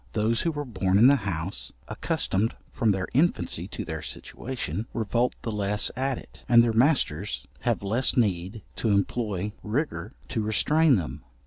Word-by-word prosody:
Those 110 +2 +1
who 165 - +1
were 145 -1 -4
born 95 -6 +1
in 110 - +7
the 140 +2 +8
house, 80 -7 -3
accustomed 105 +4 -1 0.2
from 115 - +1
their 95 -2 +1
infancy 160 +8 +1
to - - -6
their - - -3
situation, 115 -5 -5
revolt 120 +2 +1
the 115 - -2
less 105 0 +1
at 130 0 0
it, - - -13
and 120 -1 +8
their 115 -1 +1
masters 130 +6 +1
have - - 0
less 115 +8 +1
need 100 -1 0
to 115 - 0
employ 100 -1 0
rigour 105 - -2 0.2
to 110 - -1
restrain 150 +8 +4
them. 85 -7 -3
110 Hz, 160 wpm, -27 LUFS, 100-125 Hz, 0.2 s, the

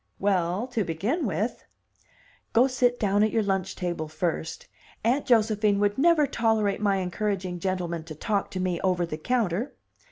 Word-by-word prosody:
"Well, 190 +1 +1
to 230 -4 0
begin 215 - -1
with 205 +6 -2 0.5
" - - -32
"Go 235 +3 +6
sit 250 -2 +1
down 205 -1 +2
at 215 - +4
your 225 0 +1
lunch 195 -2 -1
table 175 -3 -3
first. 160 0 -3 0.4
Aunt 250 +6 +1
Josephine 215 -3 +3
would 205 +3 +1
never 320 0 +5
tolerate 220 -5 +1
my 200 -2 +2
encouraging 185 -1 -2
gentlemen 175 -3 -2
to 155 -2 -8
talk 200 +5 -1
to 185 - -5
me 185 -2 -1
over 180 -2 +2
the 155 -2 -6
counter." 230 - -1
200 Hz, 165 wpm, -26 LUFS, 180-225 Hz, 0.5 s, Go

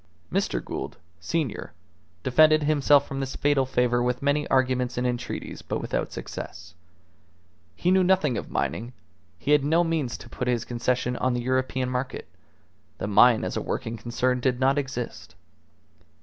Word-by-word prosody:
Mr. - - 0
Gould, - - -5 0.2
senior, 130 - -3 0.5
defended 155 +4 +5
himself 145 -1 +4
from 135 - -4
this 135 -1 -3
fatal 145 -2 +2
favour 125 -1 +2
with 125 +2 -1
many 145 +1 +1
arguments 130 -2 +1
and 125 - 0
entreaties, 125 -1 -4
but - - -3
without - - -2
success. 85 +1 -8 1.0
He 180 - +1
knew 190 0 +5
nothing 180 -8 +3
of - - -4
mining; 120 +3 -2 0.4
he 140 - -2
had 150 -2 +5
no 160 +4 +3
means 160 -7 -1
to - - -12
put 125 +1 -4
his 120 -2 0
concession 125 +1 -1
on 130 -1 +1
the 120 - -2
European 130 0 0
market; 125 +1 -3 0.7
the - - -4
mine 110 +3 +5
as - - -3
a - - -1
working 115 - -3
concern 125 +2 -1
did 125 -1 0
not 135 +2 +3
exist. 130 -4 -5
130 Hz, 160 wpm, -26 LUFS, 120-145 Hz, 1.0 s, defended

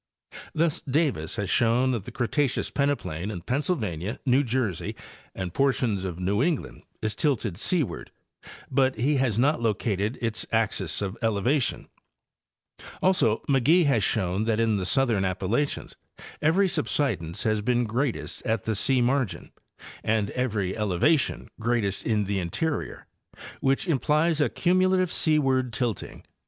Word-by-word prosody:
Thus 160 -1 +1
Davis 135 - -1
has 105 -3 -2
shown 120 +2 +3
that 115 -6 -3
the - - -7
Cretaceous 125 +3 0
pene 140 0 +2
plain 85 - -5
in 95 -5 -5
Pennsylvania, 110 - -2
New 130 +2 +4
Jersey 115 - -2 0.4
and 90 -2 -4
portions 125 -8 +1
of 90 -3 -4
New 100 +4 0
England 160 0 -1 0.2
is 110 0 0
tilted 125 - 0
seaward, 160 - -2 0.6
but 130 0 +2
he 135 +6 +1
has 125 -5 +1
not 140 +2 +2
located 105 0 0
its 115 -2 -2
axis 105 -6 0
of 95 +2 -4
elevation; 120 +5 0 1.2
also 180 - +3
McGee 145 +6 +4
has 120 -8 +2
shown 95 0 0
that 110 -1 +1
in 110 -2 +2
the 95 -2 -2
southern 120 -6 +2
Appalachians 95 +9 -1 0.5
every 180 +6 +3
subsidence 130 - -1
has 110 -1 +1
been 120 +2 +1
greatest 120 +3 -2
at 110 -3 -1
the 110 - -1
sea 125 +4 +2
margin 130 -3 -1 0.5
and 110 -1 0
every 105 -7 -1
eleva 105 - +2
tion - - -4
greatest 110 -4 -1
in 110 -2 +2
the 100 0 -1
interior, 140 - -3 0.5
which 135 +6 +1
implies 155 +1 +2
a 145 - +3
cumulative 185 0 +2
seaward 135 -5 +2
tilting. 120 -3 -3
120 Hz, 140 wpm, -26 LUFS, 105-140 Hz, 1.2 s, New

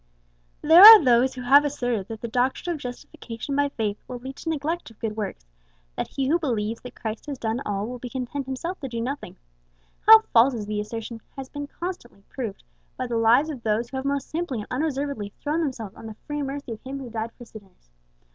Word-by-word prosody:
There 320 +4 +8
are 430 -2 +12
those 250 +1 +4
who 250 - -6
have 275 +4 +6
asserted 245 -8 -2
that 225 -1 -8
the 235 - -4
doctrine 255 +8 0
of 310 - -6
Justification 245 0 -7
by 285 0 +2
Faith 215 -6 -3
will 250 - -6
lead 265 +2 -8
to 330 - -5
neglect 320 +1 -2
of 225 - -19
good 220 -2 -4
works; 205 - -5 0.5
that - - -3
he 270 -1 -2
who 330 +5 +2
believes 230 -7 -2
that 250 - -10
Christ 220 +3 -6
has 285 -2 -4
done 225 +1 -2
all, 200 0 -2
will 250 +2 -6
be 250 - -7
content 260 +2 -4
himself 335 +8 -4
to 270 - -5
do 235 -2 -5
nothing. 270 +5 -5 0.7
How 440 0 +11
false 245 +3 +5
is 215 -3 -4
the 210 0 -3
assertion 225 +1 -7 0.2
has 265 -1 -7
been 290 0 -6
constantly 340 - -7
proved 225 -7 -6 0.3
by 255 - -2
the 240 -1 -3
lives 240 +7 +4
of 265 -5 -8
those 225 +1 -1
who 265 - -4
have 265 - -4
most 280 -1 -2
simply 325 -5 -2
and - - -9
unreservedly 275 -7 -2
thrown 300 +3 -1
themselves 235 -10 -4
on 225 - -11
the 220 - -8
free 295 0 -3
mercy 280 -2 -5
of 225 - -7
Him 270 +1 -6
who 260 -4 -8
died 225 0 -4
for 240 - -11
sinners! 195 - -16
250 Hz, 220 wpm, -25 LUFS, 225-285 Hz, 0.7 s, are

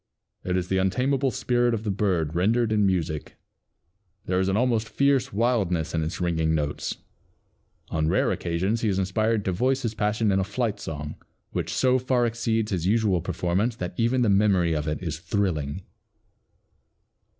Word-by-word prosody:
It 90 0 0
is 90 -1 -2
the 95 +1 +1
untamable 130 +8 +1
spirit 120 +1 +1
of 110 - -5
the 105 - -1
bird 90 -6 0
rendered 110 +6 +2
in 105 -2 +3
music. 80 -5 -2 0.9
There 90 0 0
is 95 0 +1
an 95 - +1
almost 115 -2 +1
fierce 140 -2 +2
wildness 100 -7 0
in 80 -1 0
its 80 +3 -4
ringing 80 -3 +1
notes. 75 -1 -2 0.9
On 80 -1 0
rare - - +2
occasions 95 +7 -1
he 110 - +1
is 95 - 0
inspired 105 +3 0
to 95 - +1
voice 130 +8 0
his 115 -2 -1
passion 105 0 +1
in 95 - +2
a - - +1
flight 105 +1 -2
song, 75 -3 -6 0.3
which - - -3
so 130 0 +3
far 125 -1 +1
exceeds 115 -2 -1
his 90 -2 -1
usual 105 -4 +2
performance 95 +7 -1
that 90 -5 -5
even 120 +4 +2
the 115 - +2
memory 95 -4 +3
of 75 -1 -2
it 75 +4 -3
is 80 -3 -3
thrilling." 90 -5 -2
100 Hz, 170 wpm, -25 LUFS, 85-115 Hz, 0.9 s, in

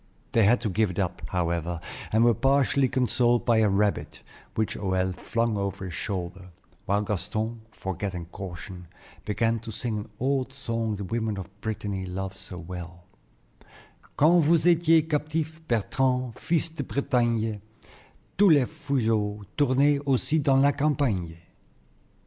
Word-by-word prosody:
They 115 -3 +4
had 120 +4 +5
to 115 - -1
give 110 +3 +2
it 90 - -7
up, 90 -3 -1
however, 85 -1 -1 0.3
and 110 +2 +4
were 120 0 +5
partially 135 +2 +3
consoled 125 -1 +2
by 115 -2 +4
a 110 -2 +4
rabbit, 100 +1 0 0.3
which 110 -1 0
Hoël 95 -1 0
flung 115 0 -1
over 100 -1 -3
his 90 - -6
shoulder, 90 -1 -4 0.4
while 100 +2 +2
Gaston, 110 +3 -3
forgetting 95 -3 -4
caution, 90 0 -8 0.4
began 115 +2 +1
to 115 +1 -8
sing 110 0 -3
an 105 - -8
old 135 0 0
song 115 -5 -2
the 100 - -5
women 110 +1 -2
of 95 +2 -9
Brittany 100 -4 -3
love 95 +1 -4
so 90 - -10
well: 90 0 -8 1.1
"Quand 165 +3 +5
vous 160 +1 +3
étiez, 165 -2 +4
captif, 155 +1 -2
Bertrand, 125 +2 0
fils 165 +4 0
de 155 - -3
Bretagne, 115 -6 0 0.8
Tous 205 -1 +7
les 145 -5 +6
fuseaux 115 -9 -1
tournaient 140 +1 +3
aussi 140 +4 +2
dans 140 -2 +3
la 140 +1 +5
campagne." 135 - 0
110 Hz, 145 wpm, -26 LUFS, 95-135 Hz, 1.1 s, Tous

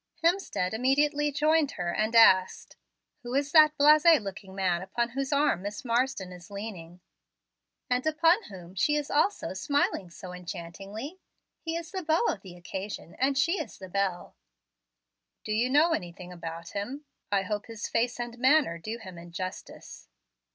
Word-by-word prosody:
Hemstead 335 - +1
immediately 290 +5 +2
joined 300 0 +2
her 175 -1 -3
and 220 +2 0
asked, 190 -5 +5 0.5
"Who 245 +1 -5
is 280 +1 0
that 305 -2 +6
blase 300 +1 +6 0.2
looking 195 -2 -8
man 180 -3 0
upon 235 +5 -2
whose 270 +3 -3
arm 285 -9 +2
Miss 205 +5 -6
Marsden 235 -5 0
is 175 -1 -12
leaning?" 185 -4 -8 0.9
"And 250 +4 0
upon 330 +6 +3
whom 180 -3 -11
she 295 +10 +2
is 295 -1 -2
also 310 - +1
smiling 200 -3 0
so 180 +1 -10
enchantingly? 195 - -7 0.4
He 325 0 -3
is 335 0 -5
the 380 -1 -3
beau 325 +6 +2
of 195 - -3
the 185 -3 -11
occasion, 190 +1 -6
and 270 +1 +2
she 335 +7 +2
is - - -9
the 190 -1 -10
belle." 190 -2 -2 1.1
"Do 215 - -5
you 230 +4 +1
know 300 +5 +4
anything 180 - -5
about 165 0 -7
him? 255 +9 -5 0.3
I 195 -1 +2
hope 205 +2 -4
his 225 -3 -5
face 240 +1 0
and 240 0 -5
manner 260 - +3
do 215 +7 -5
him 185 -6 -10
injustice." 175 +2 -8
225 Hz, 160 wpm, -28 LUFS, 185-290 Hz, 1.1 s, that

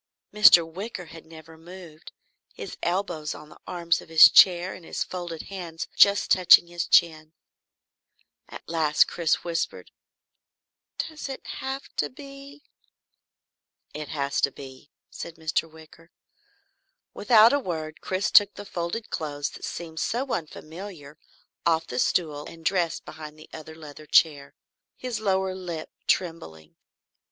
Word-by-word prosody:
Mr. 195 -6 +7
Wicker 185 +2 -7
had 165 -1 -13
never 160 0 -14
moved, 170 -2 -13 0.4
his - - -8
elbows 175 -4 -2
on 150 - -13
the - - -17
arms 170 -1 -1
of - - -16
his 155 -3 +8
chair, 180 0 +5
and 185 - -12
his - - -3
folded 175 -3 -7
hands 175 -4 -7
just 200 0 +4
touching 180 -2 +7
his 175 0 -5
chin. 155 -2 +2 1.2
At - - -11
last 155 -2 +3
Chris 170 -2 -1
whispered: 170 -1 -4 1.1
"Does 310 -3 -5
it 270 - -8
have 270 +1 -5
to - - 0
be?" 275 +1 -13 1.3
"It 150 0 -6
has 140 -2 -2
to 140 - +2
be," 135 +1 -13 0.2
said 170 - -8
Mr. 160 0 -2
Wicker. 160 +1 -17 1.0
Without 225 +2 +5
a 285 - +2
word, 160 - -6
Chris 190 +1 -2
took 205 -1 +6
the 205 - -9
folded 175 +5 -5
clothes 145 -2 -4
that - - -13
seemed 160 -2 -7
so 255 +3 -2
unfamiliar 155 -1 -8 0.4
off 165 -1 +1
the 125 - -5
stool 150 -3 -1
and 165 -1 -13
dressed 175 -4 -1
behind 155 -1 -10
the 155 - -16
other 160 0 -10
leather 155 -1 -12
chair, 145 -4 +2 0.4
his 250 -3 -4
lower 190 -2 0
lip 175 -4 -7 0.2
trembling. 80 - -3
165 Hz, 140 wpm, -25 LUFS, 155-190 Hz, 1.3 s, his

